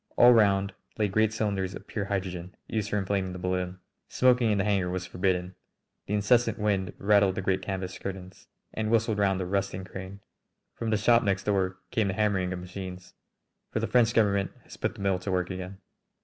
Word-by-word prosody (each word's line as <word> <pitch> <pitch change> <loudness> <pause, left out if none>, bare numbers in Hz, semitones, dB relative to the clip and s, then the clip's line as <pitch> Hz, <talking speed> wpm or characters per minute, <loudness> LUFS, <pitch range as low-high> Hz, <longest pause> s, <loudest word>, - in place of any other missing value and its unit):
All 120 0 +8
round 100 -3 +3 0.2
lay 105 -2 +2
great 110 +2 +2
cylinders 100 -4 -1
of - - -10
pure 105 -3 -3
hydrogen, 95 -2 -4
used 110 -2 -2
for 105 - 0
inflating 95 -1 -1
the - - -6
balloon. 90 0 -2 0.3
Smoking 125 -2 +3
in 105 - +2
the 100 - +2
hangar 100 -3 +1
was 90 0 -3
forbidden. 90 0 -1 0.5
The 105 - 0
incessant 120 +4 +3
wind 100 -4 0
rattled 100 -2 +3
the 95 - -3
great 95 0 +1
canvas 95 -2 -4
curtains 95 -1 -7 0.3
and 110 -1 -2
whistled 115 -1 +2
round 95 -2 +2
the 95 - -2
rusting 95 0 -2
crane. 95 +2 -8 0.5
From 115 - -4
the 110 - +2
shop 115 +3 +4
next 95 -2 0
door 95 -2 0
came 110 -3 +1
the 95 - -2
hammering 95 -4 +1
of 90 - -3
machines, 90 0 -8 0.6
for - - -2
the - - 0
French 120 -2 +3
Government 100 -3 +3
has - - -12
put - - -2
the - - -9
mill 95 -2 +1
to 95 +2 -4
work 90 0 0
again. 95 +1 -6
100 Hz, 200 wpm, -28 LUFS, 95-105 Hz, 0.6 s, All